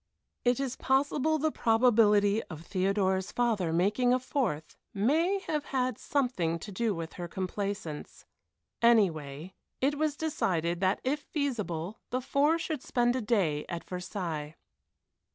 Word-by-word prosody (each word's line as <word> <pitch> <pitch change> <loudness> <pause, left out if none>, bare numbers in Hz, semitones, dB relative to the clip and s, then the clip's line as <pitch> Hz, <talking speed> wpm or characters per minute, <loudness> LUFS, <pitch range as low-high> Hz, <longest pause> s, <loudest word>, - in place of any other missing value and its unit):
It 245 0 +2
is 265 -2 -2
possible 285 +3 +2
the 310 +1 +1
probability 225 -4 +4
of 160 0 -9
Theodora's 190 0 0
father 220 -9 +1
making 210 +9 +3
a - - 0
fourth 240 - -2 0.2
may 315 - +2
have 300 -5 -2
had 255 -3 -1
something 245 - 0
thing 170 - -3
to 210 - -7
do 215 +1 0
with 165 0 -6
her 175 - -3
complaisance. 190 -3 -4 0.6
Anyway, 175 -8 +2 0.3
it 285 +2 +1
was 305 -2 0
decided 175 - 0
that 190 +1 +1
if 280 +3 0
feasible 220 - -3
the 255 - 0
four 285 +5 +2
should 320 -4 -3
spend 240 -2 +1
a 260 - -1
day 190 -10 +1
at 170 -1 -4
Versailles. 175 -4 -5
215 Hz, 140 wpm, -30 LUFS, 180-265 Hz, 0.6 s, probability